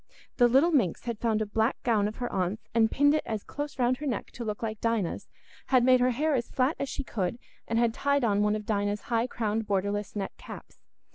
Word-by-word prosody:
The 245 -2 +6
little 270 +8 +4
minx 235 - +1
had 235 -3 -3
found 220 -2 +1
a - - -4
black 220 +3 0
gown 215 -4 +2
of 215 - -5
her 245 - -4
aunt's, 190 +3 -2
and 225 -1 +4
pinned 285 +4 +3
it 310 - +1 0.2
close 290 0 -5
round 250 0 +2
her 295 +2 -5
neck 240 -7 -3
to 240 - -7
look 210 0 -4
like 220 -1 -4
Dinah's, 230 -6 -1 0.4
had 255 -2 +4
made 255 0 +5
her 250 +1 +3
hair 295 +5 0
as 240 -3 -1
flat 265 +4 +1
as 275 - -2
she 280 - -4
could, 205 -4 -2 0.3
and 230 - 0
had 235 -1 +2
tied 280 +1 +1
on 205 -3 +2
one 210 0 +2
of 215 -1 -5
Dinah's 205 -1 -1
high 230 +1 +2
crowned 220 -2 -2
borderless 200 +1 -1
net 200 -2 -3
caps. - - -11
230 Hz, 230 wpm, -28 LUFS, 210-255 Hz, 0.4 s, The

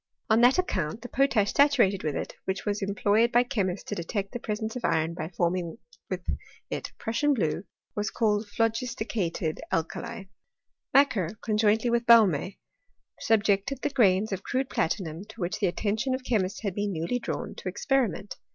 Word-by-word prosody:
On 220 +2 +5
that 245 +2 +6
account 215 - -1
the 245 - -7
^>otash 245 -7 +2
saturated 240 -10 +4
with 150 -2 -2
it, - - -4
which 190 0 -3
was 205 0 -1
employed 205 +4 +2
by 240 +1 +5
che 245 -4 -1
^sts 185 0 -2
to - - -5
detect 195 +3 -3
the 245 - -4
presence 220 +1 -3
of 250 - -5
iron 160 +1 +1
by 165 -2 -5
forming 175 -1 -1 0.3
with 185 -1 -3 0.5
it - - -4
Prussian 285 +6 +1
blue, 175 -3 -1 0.3
was 210 +1 -1
colled 210 -2 +1
phlogisticated 220 -7 -1
alkali, 200 +7 -3 0.7
Macquer, 220 - +3
conjointly 220 +2 +2
with 235 0 +1
Baume, 200 -7 +5 0.7
subjected 215 +3 +1
the 290 - 0
grains 210 -5 +3
of 195 - -2
crude 260 +1 -2
platinum, 165 -1 -1
to 220 +2 -14
which 175 -1 -2
the 200 - +2
attention 220 +8 0
of 260 - -7
chemists 200 -7 0
had 200 -3 -1
been 205 +1 -1
newly 170 +8 -1
drawn, - - -4
to - - -5
experiment. 240 - -1
210 Hz, 170 wpm, -27 LUFS, 185-235 Hz, 0.7 s, that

